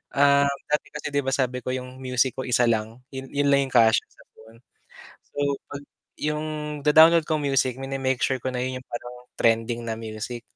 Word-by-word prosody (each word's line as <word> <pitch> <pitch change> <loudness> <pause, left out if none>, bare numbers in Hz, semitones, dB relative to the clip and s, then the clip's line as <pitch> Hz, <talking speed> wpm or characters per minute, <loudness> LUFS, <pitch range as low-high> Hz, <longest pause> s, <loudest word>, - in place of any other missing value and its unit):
ah 140 0 +5 0.2
dati 150 - 0
kasi 150 - -5
di 145 - +2
ba 135 - -2
sabi 125 -1 0
ko 125 - -5
'yong 130 0 -7
music 125 0 +1
ko - - -2
isa 125 0 +3
lang 110 -1 -1 0.2
'yon 130 0 -7
'yon 145 0 0
lang 140 0 +5
'yong - - -13
kasya 110 -1 +5
sa - - -21
phone, 110 +1 -17 0.7
so - - -14 0.3
pag 145 0 -7 0.4
'yong 150 +1 -1 0.4
da-download 160 +2 +7
ko 155 - 0
music 135 -2 +1
mine-make 135 -1 -2
sure 130 - +1
ko 130 - -9
na 125 - -1
'yon 130 0 -3
'yong 130 - -16
parang 120 +1 -7 0.2
trending 115 +1 +1
na 115 - -2
music. 115 +2 -6
130 Hz, 200 wpm, -24 LUFS, 120-140 Hz, 0.7 s, da-download